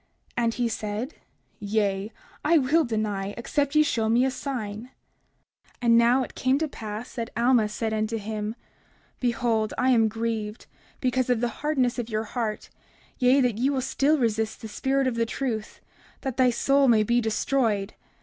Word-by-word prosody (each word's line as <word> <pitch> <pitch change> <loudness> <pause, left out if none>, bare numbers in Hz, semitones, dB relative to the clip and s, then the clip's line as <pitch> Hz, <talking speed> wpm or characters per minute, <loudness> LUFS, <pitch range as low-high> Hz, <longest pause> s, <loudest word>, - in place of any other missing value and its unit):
And 230 -1 +1
he 245 -1 0
said: 220 +4 -4 0.5
Yea, 205 0 -1 0.3
I 325 +2 +4
will 305 +4 +3
deny, 210 -3 -2
except 285 +4 -1
ye 305 - +7
shall 230 -6 0
show - - 0
me 240 +3 +4
a 265 - +1
sign. 240 -4 -5 0.9
30:46 - - -30
And 230 -1 +5
now 240 +3 +5
it - - -8
came 260 +1 +1
to 315 +1 0
pass 220 -3 -7
that 230 -2 -4
Alma 235 -2 +3
said 220 +1 -2
unto 215 +1 -1
him: 215 +1 -4 0.6
Behold, 235 -3 0
I 260 +1 +3
am 225 -3 +4
grieved 220 -1 -3 0.4
because 255 -1 +1
of 245 -2 +2
the 240 +1 0
hardness 265 -5 +1
of 235 -1 -4
your 215 -1 -1
heart, 220 -1 -4 0.5
yea, 255 +2 +5
that 240 -4 +1
ye 260 +3 +2
will 275 -2 0
still 280 +4 +2
resist 220 -3 -1
the - - -4
spirit 270 +5 0
of 255 - +1
the 230 0 0
truth, 230 -4 -4 0.4
that 265 -4 -3
thy 255 -1 +4
soul 275 +3 +3
may 225 -3 +5
be 240 +3 +2
destroyed. 220 -2 0
235 Hz, 180 wpm, -26 LUFS, 220-260 Hz, 0.9 s, ye